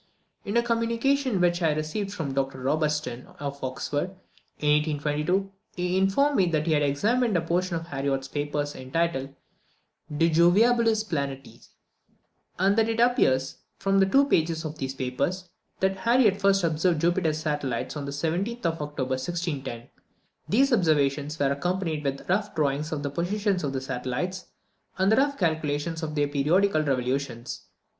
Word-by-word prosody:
In 205 +4 0
a 235 - +3
communication 235 +1 +1
which 175 0 +2
I 160 -2 +3
received 160 +7 -3
from 160 -9 -4
Dr 135 -1 -2
Robertson, 150 -2 -1
of 140 -1 -5
Oxford, 145 +7 -3 0.4
in 150 0 +2
1822, 150 +6 -1 0.2
he 180 0 -1
informed 200 +10 +2
me 185 - +4
that 155 -2 0
he 165 - +2
had 150 - +3
examined 210 - +1
a - - +1
portion 175 +2 -1
of 165 0 -4
Harriot's 135 -3 -2
papers, 145 +1 -2
entitled, 135 0 -2 0.8
"De 165 - +4
Jovialibus 215 +7 +4
Planetis;" 140 -8 -5 0.9
and 195 +2 +3
that 225 0 +2
it 225 0 -1
appears, 135 - +2 0.2
from 195 0 +3
two 275 +7 +5
pages 165 - +1
of 155 0 -6
these 135 0 -3
papers, 170 +9 -2 0.3
that 190 0 +1
Harriot 225 -2 +3
first 195 -1 +3
observed 165 +1 +1
Jupiter's 170 -1 +1
satellites 145 -6 -2
on 145 -2 -4
the 140 - -4
17th 175 +10 -2
of 165 -1 0
October, 145 -3 -4
1610. 145 -7 -4 0.6
These 270 +5 +3
observations 150 -5 +1
are 140 -1 +2
accompanied 165 +1 -2
with 140 -1 -3
rough 205 +2 0
drawings 150 0 0
of 150 -2 -3
the 140 - -2
positions 190 +4 -1
of 140 - -1
the 135 -1 -3
satellites, 135 +9 -4 0.5
and 190 +2 +3
rough 280 +3 +2
calculations 160 -1 -1
of 155 -1 -4
their 145 -1 +2
periodical 155 +5 +2
revolutions. 130 -3 -2
160 Hz, 150 wpm, -26 LUFS, 145-195 Hz, 0.9 s, two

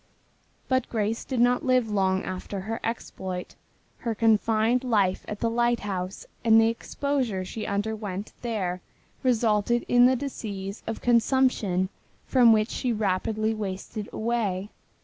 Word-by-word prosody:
But 260 -1 +1
Grace 220 0 -1
did 260 -3 -3
not 245 +1 +3
live 255 -3 +3
long 190 -2 +1
after 185 +1 -5
her 225 +4 -4
exploit. 190 -5 -4 0.5
Her 230 -2 -2
confined 225 +2 +3
life 205 -7 +1
at 210 - -6
the 230 - +2
lighthouse 205 -6 -1 0.2
and 225 -1 +6
the 225 0 +5
exposure 235 -4 -2
she 215 +4 -5
underwent 205 -1 -3
there 190 -7 -2 0.4
resulted 235 -2 +2
in 245 0 +6
the 260 - +3
disease 205 -7 -5
of 225 - -4
consumption 235 -6 +2 0.4
from 245 -3 +5
which 215 0 +3
she 250 - -1
rapidly 215 +1 0
wasted 205 0 -5
away. 215 -4 -1
220 Hz, 130 wpm, -26 LUFS, 200-240 Hz, 0.5 s, and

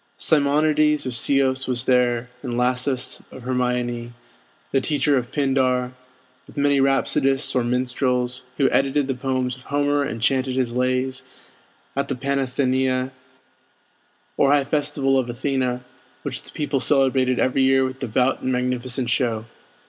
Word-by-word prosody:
Simonides 150 0 +2
of 130 - -2
Ceos 135 +1 +2
was 125 -1 0
there; 125 -1 +1
and 125 -3 -4
Lasus 125 +1 -1
of 130 - -11
Hermione, 125 -1 -2 0.6
the 135 - +2
teacher 145 0 +1
of 125 -2 -2
Pindar; 130 -3 +1 0.5
with - - -16
many 140 -1 +3
rhapsodists 135 0 +2
or 125 - +1
minstrels, 125 0 0 0.2
who 140 - +3
edited 135 +1 +1
the 135 - 0
poems 130 0 -2
of - - -16
Homer 145 0 +1
and 115 -5 -3
chanted 130 +2 +1
his 125 -2 -1
lays 130 +1 -1 0.7
at 140 - -1
the 135 - -2
Panathenæa, 130 -1 0 1.3
or 140 - +4
high 145 -1 +4
festival 145 -2 +1
of 125 -2 -2
Athena, 125 0 -2 0.4
which - - -3
the - - -12
people 145 -2 -1
celebrated 130 -2 +3
every 130 +1 +1
year 135 0 +4
with 130 0 -5
devout 130 +1 0
and 130 - -1
magnificent 125 0 -1
show. 115 -3 0
130 Hz, 140 wpm, -22 LUFS, 125-135 Hz, 1.3 s, or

